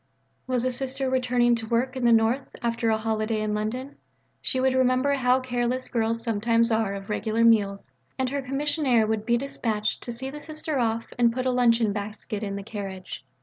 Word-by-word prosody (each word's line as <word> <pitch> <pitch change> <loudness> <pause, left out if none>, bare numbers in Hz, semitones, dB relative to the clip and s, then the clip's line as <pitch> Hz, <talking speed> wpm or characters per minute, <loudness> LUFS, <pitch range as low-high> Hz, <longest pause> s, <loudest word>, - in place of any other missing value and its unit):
Was 255 -1 0
a 255 - +1
Sister 265 +1 -2
returning 250 -2 +2
to 225 -1 -2
work 245 +3 0
in 255 -2 -1
the 235 - +5
North 230 +4 +3 0.2
after 230 -1 0
a 220 - +3
holiday 220 0 -1
in 215 0 -1
London? 240 +6 -3 0.4
She 260 - +3
would 260 0 +2
remember 260 +2 +2
how 255 -1 +3
careless 250 0 -2
girls 230 -1 0
sometimes 230 +1 +2
are 220 -3 +1
of 195 0 -8
regular 220 +2 0
meals, 205 -4 +2 0.2
and 260 -1 0
her 280 0 -1
Commissionaire 270 -3 +1
would 220 0 -2
be 235 0 +3
dispatched 225 -5 -2
to 240 - -5
see 265 +3 -5
the 295 +1 -8
Sister 310 -2 -4
off 230 -1 0
and 235 -1 +5
put 255 +2 -3
a 255 - +2
luncheon 230 -4 +3
basket 210 0 -5
in 200 -2 -3
the 200 - -5
carriage. 195 - -7
235 Hz, 195 wpm, -26 LUFS, 220-255 Hz, 0.4 s, the